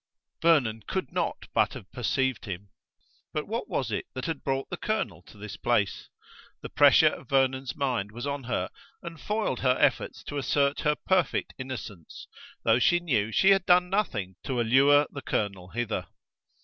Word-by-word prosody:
Vernon 135 Hz, -10 st, +3 dB
could -, -, -3 dB
not -, -, -2 dB
but -, -, +2 dB
have 95 Hz, -, -11 dB
perceived 130 Hz, 0 st, -1 dB
him! 100 Hz, -1 st, -7 dB, 0.6 s
But 150 Hz, -, -2 dB
what 230 Hz, +3 st, -3 dB
was 125 Hz, -5 st, -2 dB
it -, -, -3 dB
that 130 Hz, -, -4 dB
had 165 Hz, -4 st, -4 dB
brought 135 Hz, 0 st, -1 dB
the -, -, -3 dB
colonel -, -, -2 dB
to -, -, -15 dB
this 105 Hz, 0 st, -8 dB
place? 110 Hz, -3 st, 0 dB, 0.5 s
The -, -, -6 dB
pressure -, -, +6 dB
of -, -, -11 dB
Vernon's 135 Hz, -1 st, +1 dB
mind 125 Hz, -7 st, -1 dB
was 120 Hz, +4 st, -6 dB
on 140 Hz, -2 st, -3 dB
her 120 Hz, -, -2 dB, 0.3 s
and 165 Hz, -3 st, -8 dB
foiled 210 Hz, -, -1 dB
her 130 Hz, -1 st, +2 dB
efforts -, -, +1 dB
to 145 Hz, -, -4 dB
assert 140 Hz, +2 st, +1 dB
her 150 Hz, -1 st, +2 dB
perfect 185 Hz, -2 st, 0 dB
innocence, 115 Hz, -10 st, -8 dB, 0.4 s
though 115 Hz, +1 st, +4 dB
she 175 Hz, +7 st, +4 dB
knew 115 Hz, -11 st, 0 dB
she 190 Hz, -, +5 dB
had 195 Hz, -2 st, +3 dB
done 180 Hz, 0 st, +4 dB
nothing 105 Hz, -, -1 dB
to 130 Hz, -3 st, -2 dB
allure 135 Hz, +5 st, +5 dB
the 140 Hz, -, -7 dB
colonel 100 Hz, -7 st, -2 dB
hither. 115 Hz, 0 st, -3 dB
130 Hz, 175 wpm, -27 LUFS, 110-150 Hz, 0.6 s, pressure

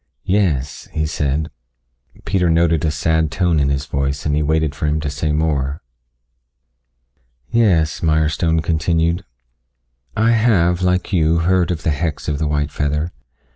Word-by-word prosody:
"Yes," 80 Hz, -9 st, 0 dB
he 80 Hz, -, 0 dB
said. 75 Hz, 0 st, -2 dB, 0.7 s
Peter 90 Hz, -3 st, +1 dB
noted 85 Hz, -1 st, +2 dB
a 80 Hz, -, +2 dB
sad 80 Hz, +2 st, 0 dB
tone 85 Hz, 0 st, +1 dB
in 70 Hz, -1 st, +1 dB
his 70 Hz, +1 st, -1 dB
voice, 70 Hz, 0 st, -2 dB
and 75 Hz, -1 st, +1 dB
he 75 Hz, -, +1 dB
waited 80 Hz, 0 st, +1 dB
for 75 Hz, -, -3 dB
him 75 Hz, +1 st, 0 dB
to 75 Hz, -2 st, -3 dB
say 75 Hz, +1 st, -2 dB
more. 75 Hz, -2 st, -1 dB, 1.7 s
"Yes," 95 Hz, -10 st, +2 dB
Mirestone 80 Hz, +1 st, +1 dB
continued. 85 Hz, +2 st, 0 dB, 0.9 s
"I 110 Hz, +2 st, +3 dB
have, 95 Hz, -7 st, +2 dB
like 90 Hz, +1 st, 0 dB
you, 80 Hz, -1 st, +2 dB
heard 90 Hz, -2 st, +2 dB
of 85 Hz, -2 st, -3 dB
the 80 Hz, -, +1 dB
hex 75 Hz, 0 st, -3 dB
of 75 Hz, -1 st, -1 dB
the 80 Hz, -, 0 dB
white 75 Hz, -1 st, -1 dB
feather. 75 Hz, +3 st, -1 dB
80 Hz, 150 wpm, -19 LUFS, 75-85 Hz, 1.7 s, I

